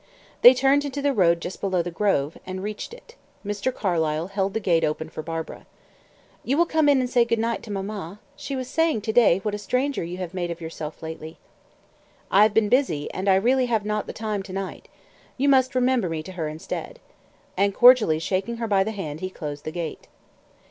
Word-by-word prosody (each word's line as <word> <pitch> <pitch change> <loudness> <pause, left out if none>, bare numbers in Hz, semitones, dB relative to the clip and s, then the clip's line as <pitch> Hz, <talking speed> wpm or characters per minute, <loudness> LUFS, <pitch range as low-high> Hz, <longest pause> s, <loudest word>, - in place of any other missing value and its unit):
They 250 +1 +10
turned 275 +3 +3
into 285 0 -4
the 280 0 +1
road 170 -6 +3
just 175 - -6
below 185 -3 0
the 175 - -5
grove, 165 -6 0
and 185 0 -6
reached 210 - -5
it. 470 0 -14 0.3
Mr. 205 +5 -1
Carlyle 165 -6 -1
held 195 0 -2
the - - +1
gate 170 -6 +2
open 155 +1 -2
for 155 - -6
Barbara. 165 0 -6 0.8
"You 275 +4 0
will 340 - +4
come 315 -3 +2
in 280 -2 +5
and 255 - 0
say 245 -1 +3
good 230 0 0
night 230 +1 -1
to 220 - -9
mamma. 195 -1 -5 0.2
She 280 - -5
was 255 -1 -4
saying 325 -5 +1
to 220 +1 -3
day 205 -6 +5
what 210 - -2
a 210 - -3
stranger 255 +6 -1
you 175 +2 -6
have 180 -1 -6
made 175 -2 -3
of 170 0 -5
yourself 160 -1 -7
lately." 160 0 -7 0.9
"I 195 - +6
have 215 0 +5
been 220 -1 +4
busy; 205 - +1
and 190 +2 -1
I 190 - +6
really 250 +6 +2
have 220 -3 0
not 210 0 -2
the - - -4
time 215 -2 -3
to 190 -1 -10
night. 195 -1 -5 0.5
You 275 +2 +1
must 260 -2 +3
remember 250 -6 +2
me 160 -1 -3
to 185 - -9
her 170 -4 -3
instead." 160 - -6 0.6
And 200 +1 +1
cordially 245 -10 +6
shaking 190 +8 -2
her 230 -1 -3
by 195 -2 +3
the 220 +3 -4
hand, 155 -7 -5
he 185 - -4
closed 150 -5 -7
the 155 - -3
gate. 170 -2 -6
200 Hz, 215 wpm, -24 LUFS, 170-245 Hz, 0.9 s, They